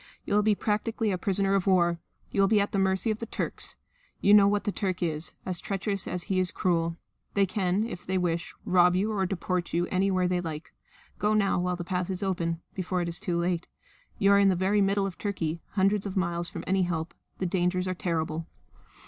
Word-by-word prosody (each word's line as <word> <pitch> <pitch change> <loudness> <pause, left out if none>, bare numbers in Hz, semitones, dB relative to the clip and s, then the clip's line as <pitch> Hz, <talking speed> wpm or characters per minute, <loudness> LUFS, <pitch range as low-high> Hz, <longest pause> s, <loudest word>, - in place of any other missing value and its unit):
"You - - -2
will 210 - +5
be 210 0 +3
practically 215 +1 -1
a 185 - 0
prisoner 195 +1 +1
of 195 -1 +1
war. 175 -3 +3 0.3
You 200 - +2
will 195 - +5
be 210 +1 +4
at 200 - 0
the 195 - 0
mercy 190 +3 +1
of 215 - -3
the 230 - -5
Turks. - - -2 0.4
You 205 - +4
know 205 -1 +8
what 205 0 +1
the 210 - -1
Turk 185 -3 -2
is 160 -1 -2
as 185 -2 -2
treacherous 195 0 -2
as 180 -1 -2
he 185 0 0
is 185 -1 +3
cruel. 165 -2 0 0.4
They 200 -1 +4
can, 190 0 0
if 200 -6 -6
they 190 0 +1
wish, 170 -2 -1
rob 180 -1 +4
you 205 +4 +1
or 195 -3 0
deport 180 -1 -2
you 170 +1 +2
anywhere 185 -1 +2
they 180 0 0
like. 160 -2 -6 0.5
Go 210 +1 +2
now 200 -3 +2
while 180 0 0
the 175 - -5
path 180 0 -2
is 190 +1 -3
open 170 -3 -1
before 185 -1 -2
it 170 - -2
is 170 - -1
too 180 -5 -1
late. 175 0 -1 0.5
You 200 0 +4
are 200 - +6
in 200 -1 +5
the 185 - +3
very 195 +3 +2
middle 195 0 +2
of 190 -2 -6
Turkey, 170 -5 -2
hundreds 200 +1 +2
of 195 - -5
miles 175 -2 0
from - - -7
any 190 0 +2
help. 170 -2 -2 0.2
The 185 - -2
dangers 180 +1 0
are 185 - 0
terrible." 165 -2 -2
185 Hz, 225 wpm, -28 LUFS, 175-200 Hz, 0.5 s, know